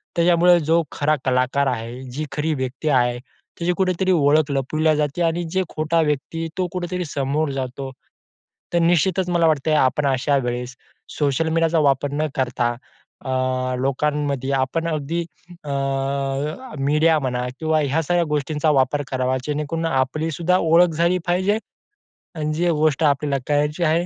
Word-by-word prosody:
त्याच्यामुळं 175 Hz, +1 st, +5 dB
जो 165 Hz, +1 st, +4 dB
खरा 150 Hz, +1 st, +1 dB
कलाकार 130 Hz, +2 st, +1 dB
आहे 120 Hz, 0 st, -4 dB
जी 150 Hz, +5 st, -4 dB
खरी 155 Hz, +1 st, -1 dB
व्यक्ती 130 Hz, +3 st, -3 dB
आहे, 125 Hz, -3 st, +2 dB, 0.4 s
त्याची 175 Hz, +1 st, +1 dB
कुठेतरी 190 Hz, 0 st, +1 dB
ओळख 150 Hz, -2 st, +3 dB
लपविली 155 Hz, +3 st, +1 dB
जाते 150 Hz, +3 st, -1 dB
आणि 165 Hz, +1 st, 0 dB
जे 190 Hz, +1 st, +1 dB
खोटा 155 Hz, +2 st, 0 dB
व्यक्ती 155 Hz, +2 st, -2 dB
तो 185 Hz, -1 st, 0 dB
कुठेतरी 180 Hz, 0 st, -3 dB
समोर 145 Hz, +1 st, -1 dB
जातो. 135 Hz, 0 st, -4 dB, 0.8 s
तर 170 Hz, -, +3 dB
निश्चितच 175 Hz, +2 st, +2 dB
मला 170 Hz, -1 st, +3 dB
वाटतंय 155 Hz, 0 st, +1 dB
आपण 145 Hz, +1 st, +2 dB
अशा 135 Hz, +1 st, +1 dB
वेळेस 125 Hz, +1 st, -4 dB, 0.4 s
सोशल 145 Hz, +2 st, +1 dB
मीडियाचा 165 Hz, 0 st, +2 dB
वापर 140 Hz, -1 st, +2 dB
न 155 Hz, +2 st, 0 dB
करता 125 Hz, -3 st, 0 dB, 0.5 s
अ, -, -, -4 dB, 0.5 s
लोकांमध्ये 140 Hz, 0 st, -1 dB
आपण 135 Hz, +5 st, 0 dB
अगदी 160 Hz, +1 st, -2 dB, 0.4 s
अ, -, -, -6 dB, 1.1 s
मीडिया 150 Hz, +3 st, +3 dB
म्हणा 125 Hz, -2 st, -2 dB
किंवा 160 Hz, -1 st, +1 dB
ह्या 145 Hz, +3 st, +1 dB
सगळ्या 175 Hz, +3 st, +1 dB
गोष्टींचा 150 Hz, +1 st, 0 dB
वापर 140 Hz, +1 st, +2 dB
करावा 130 Hz, 0 st, 0 dB
जेणेकरून 150 Hz, +2 st, -2 dB
आपली 155 Hz, +2 st, 0 dB
सुद्धा 175 Hz, +4 st, +1 dB
ओळख 170 Hz, +1 st, +4 dB
झाली 170 Hz, +3 st, +2 dB
पाहिजे. 185 Hz, +4 st, +2 dB, 0.8 s
आणि 155 Hz, -1 st, -2 dB
जी 175 Hz, +3 st, +1 dB
गोष्ट 155 Hz, -1 st, +1 dB
आपल्याला 145 Hz, -1 st, +2 dB
करायची 150 Hz, +3 st, 0 dB
आहे. 165 Hz, +2 st, +2 dB
150 Hz, 145 wpm, -21 LUFS, 135-165 Hz, 1.1 s, त्याच्यामुळं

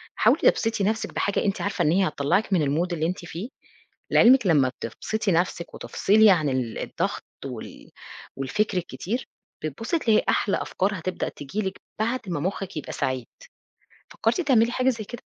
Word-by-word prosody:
حاولي -, -, +3 dB
تبسطي 225 Hz, -3 st, -1 dB
نَفْسِك 220 Hz, +3 st, -1 dB
بحاجة 200 Hz, -, 0 dB
أنتِ 200 Hz, 0 st, 0 dB
عارفة 200 Hz, -, 0 dB
إن 150 Hz, -, +3 dB
هي 190 Hz, +2 st, +3 dB
هتطلعك 155 Hz, +8 st, 0 dB
من 175 Hz, -, +4 dB
الmood 170 Hz, +6 st, 0 dB
اللي 160 Hz, -1 st, -1 dB
أنتِ 175 Hz, 0 st, -4 dB
فيه، 175 Hz, +9 st, -6 dB, 0.6 s
لعلمِك 245 Hz, -2 st, +6 dB
لمّا 145 Hz, -7 st, +4 dB
بتبسطي 205 Hz, -, -2 dB
نفْسِك 170 Hz, 0 st, 0 dB
وتفصلي 215 Hz, +1 st, +4 dB
عن 155 Hz, -6 st, +2 dB
ال 125 Hz, -4 st, -2 dB
الضغط -, -, -3 dB, 0.2 s
وال -, -, -8 dB, 0.5 s
والفكر 190 Hz, +9 st, 0 dB
الكتير، 205 Hz, +7 st, -3 dB, 0.4 s
بتبُصي 225 Hz, -, -2 dB
تلاقي 220 Hz, -5 st, +3 dB
أحلى 200 Hz, -, +2 dB
أفكار 195 Hz, 0 st, -1 dB
هتبدأ 185 Hz, +2 st, -3 dB
تيجي 145 Hz, +10 st, -5 dB
لِك 190 Hz, 0 st, -4 dB, 0.2 s
بعد 235 Hz, +4 st, 0 dB
ما 170 Hz, -, -1 dB
مخِك 190 Hz, +2 st, -3 dB
يبقى 150 Hz, -, -5 dB
سعيد، 130 Hz, -2 st, -2 dB, 0.8 s
فكرتِ -, -, 0 dB
تعملي 240 Hz, -7 st, +3 dB
حاجة 255 Hz, +1 st, +1 dB
زي 225 Hz, -4 st, -4 dB
كده؟ 240 Hz, +3 st, -9 dB
190 Hz, 165 wpm, -25 LUFS, 160-220 Hz, 0.8 s, لعلمِك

